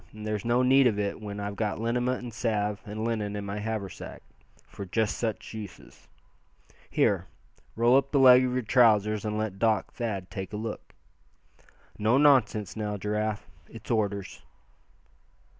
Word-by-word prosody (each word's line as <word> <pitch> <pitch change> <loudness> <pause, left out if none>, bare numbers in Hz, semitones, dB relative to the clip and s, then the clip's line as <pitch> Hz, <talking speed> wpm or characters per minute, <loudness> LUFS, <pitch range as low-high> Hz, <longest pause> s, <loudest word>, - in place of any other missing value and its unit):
And 105 0 -9
there's 105 -2 -2
no 120 +2 +2
need 135 +1 +5
of 110 -4 0
it 100 +1 -2
when 105 -1 -6
I've 100 0 -4
got 105 0 -2
liniment 125 +2 -1
and 120 -2 -7
salve 105 -3 -1
and 110 +2 -4
linen 105 -3 -2
in 100 -1 -4
my 100 +1 -4
haversack, 105 -3 -5 0.4
for - - -9
just 105 +1 -1
such 115 -2 -4
uses. 105 -5 -10 0.8
Here, - - +1 0.5
roll 120 +2 +4
up 140 0 0
the 145 - +2
leg 130 -1 +8
of 125 -1 -1
your 130 0 -1
trousers 110 -3 +3
and 105 0 -2
let 110 -3 -3
Doc 110 -1 +1
Thad 100 -7 -4
take 95 -1 -6
a - - -3
look. 110 0 -7 1.0
No 110 +4 +3
nonsense, 130 -8 +3
now, 105 -1 -3
Giraffe. 105 +1 -2 0.2
It's - - -9
orders." 100 -4 -2
110 Hz, 160 wpm, -27 LUFS, 105-120 Hz, 1.0 s, leg